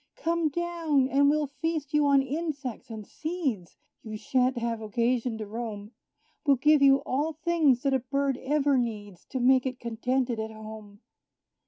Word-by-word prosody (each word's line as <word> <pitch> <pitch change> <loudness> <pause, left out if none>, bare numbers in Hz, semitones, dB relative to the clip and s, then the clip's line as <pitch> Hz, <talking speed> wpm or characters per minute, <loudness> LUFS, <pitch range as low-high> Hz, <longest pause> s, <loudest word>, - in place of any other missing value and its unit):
Come 335 -1 0
down, 330 -4 0
and 280 +1 +4
we'll 300 0 +2
feast 300 +1 -4
you 300 -1 +3
on 275 -1 +4
insects 280 -4 -4
and 220 -2 -7
seeds; 285 - -4 0.2
You 215 -1 -7
sha'nt 255 +3 +1
have 230 -1 -2
occasion 235 +2 0
to 215 - -5
roam 215 -1 -6 0.5
We'll 285 -3 +4
give 300 +3 +4
you 275 0 +5
all 295 +5 -1
things 310 -5 +2
that 275 -1 +1
a 265 - +3
bird 275 +1 -1
ever 285 -1 +1
needs, 205 -6 -5
To 260 - -4
make 255 +1 +4
it 255 -1 -5
contented 240 +1 -1
at 220 0 -3
home. 215 -1 -11
265 Hz, 165 wpm, -27 LUFS, 230-295 Hz, 0.5 s, you